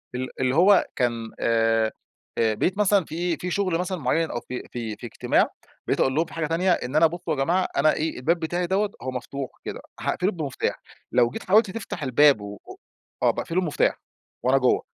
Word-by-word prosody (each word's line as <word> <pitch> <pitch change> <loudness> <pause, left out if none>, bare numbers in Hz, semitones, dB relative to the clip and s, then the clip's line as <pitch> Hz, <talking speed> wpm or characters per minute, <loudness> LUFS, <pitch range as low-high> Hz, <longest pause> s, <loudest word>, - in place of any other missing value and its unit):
ال 130 +1 -2
اللي 130 +1 +1
هو 190 +3 +6
كان 115 -2 -1
آآ، 115 -1 +2 0.5
بقبت 115 - +1
مثلًا 205 -3 +3
فيه 170 +1 -2
في 180 - -4
شغل 185 -3 +1
مثلًا 180 +1 -2
معين 160 +3 0
أو 120 - -2
في 125 - -6
في 115 -3 -4
في - - -10
اجتماع، - - +1 0.4
بقيت - - 0
أقول 130 - +2
لهم 160 +2 +2
في - - -14
حاجة 160 -2 -2
تانية 175 +3 +1
إن 130 -4 -1
أنا 160 +1 +6
بُصّوا 170 -1 -4
يا - - -1
جماعة 180 +5 +1
أنا 155 +2 +4
إيه، 160 +1 -2
الباب 165 +7 +1
بتاعي 175 +2 -1
دوّة 200 +3 +1
هو 130 - -3
مفتوح 130 +2 -5 0.2
كده، - - -5 0.2
هاقفله 185 +3 0
بمفتاح، 150 -8 -3 0.3
لو 120 -1 +4
جيت - - -7
حاولت 205 +1 +4
تفتح 225 -7 -6
الباب 135 -2 +5
و 100 0 -7 0.7
آه - - +5
باقفله 175 +3 -2
بمفتاح 160 -5 0 0.4
وأنا 130 +2 +4
جوا، 130 -2 +3
155 Hz, 195 wpm, -25 LUFS, 125-180 Hz, 0.7 s, هو